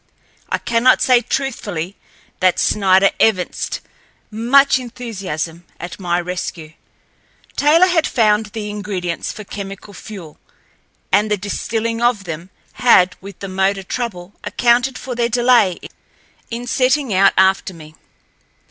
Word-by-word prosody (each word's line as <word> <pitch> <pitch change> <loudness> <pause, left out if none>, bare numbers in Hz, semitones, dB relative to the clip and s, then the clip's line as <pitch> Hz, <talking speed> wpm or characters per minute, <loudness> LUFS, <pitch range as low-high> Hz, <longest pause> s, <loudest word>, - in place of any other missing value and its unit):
I - - 0
cannot 235 +2 +3
say 250 -2 +4
truthfully 205 -9 -3 0.4
that 185 -1 +3
Snider 195 -1 +3
evinced 185 -5 0 0.5
much 255 +5 +4
enthusiasm 195 -10 -5 0.2
at 175 +3 -7
my 175 -2 0
rescue. 175 -3 -5 0.8
Taylor 315 +5 +5
had 355 -3 +2
found 215 -2 +2
the 210 0 -6
ingredients 195 -5 -4
for 215 - -9
chemical 200 0 -8
fuel, 185 -6 -10 0.7
and 205 +3 +3
the 210 - +1
distilling 225 +3 -3
of 240 -4 +2
them 165 +1 -7 0.2
had, 185 -7 +4
with 195 +1 -11
the 195 - -4
motor 195 +1 0
trouble, 195 -4 -5
accounted 245 +2 +2
for 255 - -6
their 235 -1 0
delay 240 -6 +3 0.7
in 235 +1 -5
setting 255 0 +1
out 190 +1 +5
after 190 0 +3
me. 155 -3 -13
205 Hz, 125 wpm, -18 LUFS, 185-240 Hz, 0.8 s, Taylor